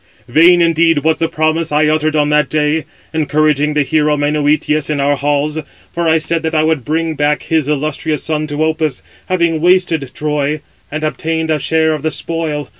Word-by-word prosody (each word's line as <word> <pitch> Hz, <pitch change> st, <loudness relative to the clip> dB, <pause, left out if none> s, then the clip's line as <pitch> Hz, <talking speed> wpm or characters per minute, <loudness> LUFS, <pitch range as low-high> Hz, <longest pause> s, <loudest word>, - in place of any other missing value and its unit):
vain 170 Hz, +7 st, +5 dB
indeed 165 Hz, -2 st, +2 dB
was 160 Hz, 0 st, +1 dB
the 165 Hz, -, +1 dB
promise 155 Hz, 0 st, 0 dB
I 150 Hz, +1 st, +3 dB
uttered 155 Hz, 0 st, +1 dB
on 150 Hz, -1 st, +2 dB
that 150 Hz, 0 st, +2 dB
day, 150 Hz, +1 st, 0 dB, 0.3 s
encouraging 150 Hz, -1 st, +1 dB
the 150 Hz, -, +3 dB
hero 150 Hz, +1 st, +1 dB
Menœtius 150 Hz, 0 st, 0 dB
in 150 Hz, -2 st, -1 dB
our 140 Hz, +1 st, +2 dB
halls; 145 Hz, +2 st, -1 dB, 0.3 s
for 170 Hz, -1 st, -1 dB
I 160 Hz, -, +4 dB
said 165 Hz, +1 st, 0 dB
that 160 Hz, 0 st, -2 dB
I 155 Hz, -, +3 dB
would 155 Hz, -4 st, 0 dB
bring 160 Hz, +3 st, -1 dB
back 150 Hz, 0 st, 0 dB
his 160 Hz, -3 st, 0 dB
illustrious 150 Hz, 0 st, -2 dB
son 155 Hz, -1 st, -2 dB
to 145 Hz, +1 st, -2 dB
Opus, 155 Hz, -4 st, -2 dB, 0.2 s
having 170 Hz, -3 st, 0 dB
wasted 175 Hz, -5 st, +2 dB
Troy, 150 Hz, 0 st, -1 dB, 0.3 s
and 155 Hz, +1 st, -4 dB
obtained 160 Hz, +1 st, -2 dB
a 155 Hz, -, +1 dB
share 160 Hz, +2 st, +1 dB
of 155 Hz, -, -4 dB
the 160 Hz, -, 0 dB
spoil. 155 Hz, -2 st, -3 dB
155 Hz, 190 wpm, -15 LUFS, 150-160 Hz, 0.3 s, vain